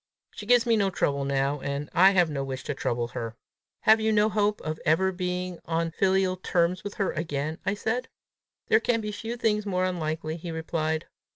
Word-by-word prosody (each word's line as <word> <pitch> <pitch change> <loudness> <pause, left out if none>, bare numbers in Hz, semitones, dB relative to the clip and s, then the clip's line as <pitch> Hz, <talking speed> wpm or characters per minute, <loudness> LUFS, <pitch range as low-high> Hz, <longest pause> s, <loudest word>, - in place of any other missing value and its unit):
She 205 - -9
gives 245 0 +5
me 230 -1 +3
no 200 -2 +2
trouble 140 -6 0
now, 140 +1 0
and 140 +1 -3
I 185 +3 +7
have 180 -3 +4
no 140 -2 -2
wish 135 -1 -5
to 145 - -3
trouble 120 -3 -2
her." 115 -1 -5 0.5
"Have 220 +1 +6
you 220 0 +2
no 210 0 +4
hope 210 -1 +1
of 155 0 -4
ever 190 +5 +3
being 180 -1 -3
on 165 0 -1
filial 190 +1 +2
terms 180 0 0
with 205 - -6
her 200 - 0
again?" 155 -1 -3
I 200 - +2
said. 245 +5 -2 0.6
"There 220 - +4
can 230 0 +1
be 210 0 -4
few 225 +3 -5
things 215 -2 +1
more 185 -2 0
unlikely," 160 -3 -2
he 170 +1 -7
replied. 160 -1 -2
180 Hz, 200 wpm, -27 LUFS, 155-205 Hz, 0.6 s, I